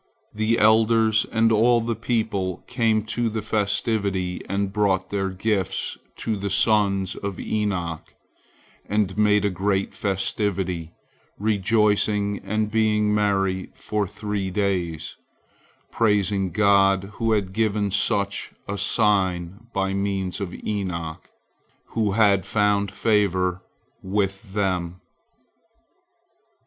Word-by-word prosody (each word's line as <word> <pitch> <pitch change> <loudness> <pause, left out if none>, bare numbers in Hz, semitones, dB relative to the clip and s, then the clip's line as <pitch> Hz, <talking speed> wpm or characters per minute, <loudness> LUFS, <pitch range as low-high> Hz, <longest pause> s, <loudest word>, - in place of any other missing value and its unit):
The 110 +2 +1
elders 110 0 +4
and 115 0 +3
all 120 +2 +4
the 115 0 -2
people 110 -6 -2
came 115 -4 +1
to 115 +1 -1
the 110 -1 -4
festivity 100 -3 -1
and 100 0 -1
brought 100 -3 +1
their 95 -1 -1
gifts 95 0 -1 0.2
to 110 - -2
the 100 0 -3
sons 100 -2 +2
of 100 -2 -5
Enoch, 90 -6 -2 0.8
and 100 -2 0
made 105 -1 +3
a 100 - +1
great 95 +1 -1
festivity, 95 -3 -2 0.5
rejoicing 105 0 +1
and 110 0 -1
being 105 -1 +2
merry 95 -3 0
for 105 -2 -2
three 105 -1 -3
days, 90 -5 -2 0.7
praising 100 -3 +1
God, 100 0 +3
who 115 -1 +2
had 100 -3 -1
given 105 -2 0
such 100 0 0
a 100 0 -3
sign 95 -1 +1
by 95 -2 -1
means 100 -1 -2
of 95 -3 -3
Enoch, 90 -6 -4 0.6
who 110 -4 0
had 100 -3 +4
found 105 -1 +2
favor 95 -4 +1 0.4
with 95 +1 -2
them. 90 -3 -1
100 Hz, 110 wpm, -23 LUFS, 95-110 Hz, 0.8 s, elders